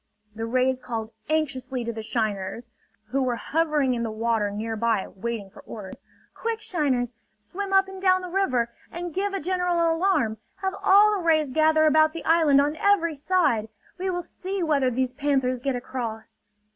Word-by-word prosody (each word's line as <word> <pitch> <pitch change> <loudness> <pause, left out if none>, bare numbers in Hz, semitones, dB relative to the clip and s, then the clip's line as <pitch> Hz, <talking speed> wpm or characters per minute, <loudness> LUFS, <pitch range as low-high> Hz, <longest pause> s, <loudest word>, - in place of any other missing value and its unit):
The 225 +1 -4
rays 255 +2 +1
called 230 -3 -5 0.2
anxiously 265 -5 -1
to 235 0 -3
the 220 - -5
shiners, 220 0 -3 0.4
who 275 +3 0
were 250 -2 0
hovering 300 -1 +1
in 235 - -2
the 230 - -2
water 220 -1 0
nearby 220 0 -1
waiting 210 -1 -5
for - - -14
orders: 200 -4 -8 0.4
"Quick, 460 -1 -3
shiners! 275 - 0 0.2
Swim 385 - -6
up 385 0 +4
and 385 0 -9
down 370 -1 +3
the 360 - -6
river, 255 -12 +1 0.2
and 345 -1 -5
give 395 +2 -1
a - - -1
general 350 -1 +1
alarm! 325 - +1 0.2
Have 380 0 -2
all 405 +2 +6
the 400 -4 -1
rays 310 -4 +2
gather 315 +2 +4
about 310 0 +4
the 330 - -7
island 320 -4 +5
on 295 +2 +1
every 365 -5 +3
side! 280 -8 +1 0.3
We 375 +1 -1
will 355 -1 -2
see 380 +2 -4
whether 285 -5 +2
these 255 +1 -1
panthers 265 -3 0
get 270 +1 -1
across!" 235 -3 -6
280 Hz, 175 wpm, -25 LUFS, 235-350 Hz, 0.4 s, all